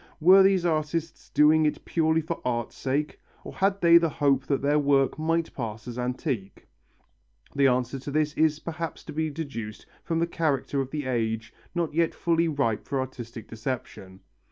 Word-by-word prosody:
Were 185 +4 +7
these 190 -2 +4
artists 160 0 -2
doing 155 +1 +5
it 150 - -3
purely 160 -1 +1
for 160 +2 -5
art's 120 -2 -2
sake, 140 +3 -2 0.2
or - - -8
had 195 +1 0
they 170 0 +7
the 165 -1 +1
hope 140 -2 +1
that 140 -1 0
their 145 +1 +3
work 140 0 +2
might 165 +1 0
pass 115 -3 -6
as 120 0 -6
antique? 125 - -4 0.9
The 140 -1 +4
answer 125 +1 0
to 135 - -7
this 150 +1 0
is 155 -1 +2
perhaps 165 0 -6
to - - -9
be 160 +1 -1
deduced 135 -9 -6 0.2
from 165 - -1
the 165 - +2
character 145 -5 -1
of 130 - -4
the 150 -1 -4
age 115 -3 -2 0.2
not 170 -3 -1
yet 165 +1 +1
fully 165 0 +1
ripe 140 -8 -1
for 140 - -1
artistic 120 -4 -6
deception. 110 -5 -6
145 Hz, 180 wpm, -26 LUFS, 125-165 Hz, 0.9 s, Were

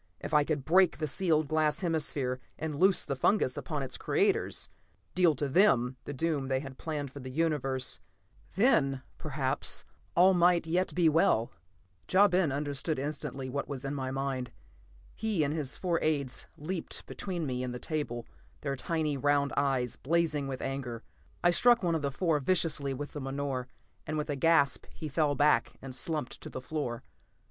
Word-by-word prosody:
If - - -6
I 150 -1 +6
could 145 -3 -2
break 185 +1 +4
the 155 - -1
sealed 155 0 +1
glass 155 +1 +1
hemisphere, 145 -7 -1 0.2
and 150 -2 -4
loose 190 0 +4
the 140 - -2
fungus 130 -1 +2
upon 150 -4 -3
its 130 - -5
creators; - - +1 0.5
deal 175 -4 +4
to 145 +2 -1
them 135 - +4
the - - -4
doom 145 -1 -1
they 130 0 +1
had 135 -1 -9
planned 145 -4 -4
for 140 - -9
the 130 -1 -7
universe, 135 -3 0 0.6
then 140 - +3 0.2
perhaps 140 -3 -1 0.3
all 185 +2 +6
might 175 -1 +4
yet 175 +3 0
be 175 -2 +4
well. 150 -7 +3 0.6
Ja 200 +2 +7
Ben 180 -5 +2
understood 145 +2 -1
instantly 140 -1 -4
what 140 +2 -3
was 140 -2 -5
in 135 - -2
my 130 -2 -3
mind. 135 -2 -2 0.6
He 215 -7 0
and 145 0 0
his 150 -4 -1
four 175 -3 0
aides 140 -5 -1
leaped 170 +3 -4
between 175 -5 -4
me 125 -2 -2
and 125 -1 -3
the 125 - -4
table, 120 -4 -3 0.4
their 140 -2 -2
tiny 155 +1 -1
round 145 +1 +2
eyes 135 -4 0
blazing 155 -2 +1
with 130 -1 -4
anger. 125 -4 -4 0.4
I 175 - +6
struck 240 +5 +5
one 170 -2 +2
of 160 - 0
the 140 - 0
four 160 +2 +1
viciously 150 -3 +2
with 145 +2 -6
the 145 - -5
menore, 135 -1 -3 0.4
and 155 +1 -2
with 150 0 -2
a - - -1
gasp 145 0 +3
he 155 - -5
fell 150 0 +1
back 145 +2 +3
and 135 -1 -8
slumped 150 +1 -2
to - - -7
the - - -6
floor. 130 -4 -4
145 Hz, 180 wpm, -30 LUFS, 135-165 Hz, 0.6 s, Ja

